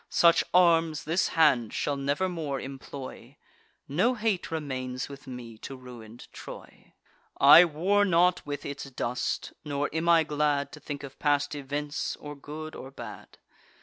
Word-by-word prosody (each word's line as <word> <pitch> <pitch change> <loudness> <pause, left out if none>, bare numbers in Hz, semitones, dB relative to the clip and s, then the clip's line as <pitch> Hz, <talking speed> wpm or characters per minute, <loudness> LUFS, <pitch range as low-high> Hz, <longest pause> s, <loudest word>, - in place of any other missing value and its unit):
Such 170 -1 +5
arms 165 -3 +4
this 170 +3 +1
hand 120 -8 +4
shall 145 - -1
never 140 +6 0
more 155 -6 -3
employ; 135 0 -9 0.5
No 185 - +2
hate 215 -5 -1
remains 130 -5 -4
with 140 0 -11
me 120 -3 -9
to 135 - -7
ruin'd 120 -3 -12
Troy. - - -11 0.5
I 145 +5 +10
war 180 +6 +2
not 180 -1 +3
with 145 -1 -5
its 140 0 -5
dust; 125 -2 -3
nor 145 -1 -2
am 160 +1 0
I 165 -1 +6
glad 150 -1 0
To 150 - -10
think 145 -1 -6
of 135 -1 -10
past 145 0 +1
events, 145 +1 -3
or 145 0 -9
good 155 +2 -8
or 130 - -8
bad. 120 -5 -10
145 Hz, 150 wpm, -28 LUFS, 135-165 Hz, 0.5 s, I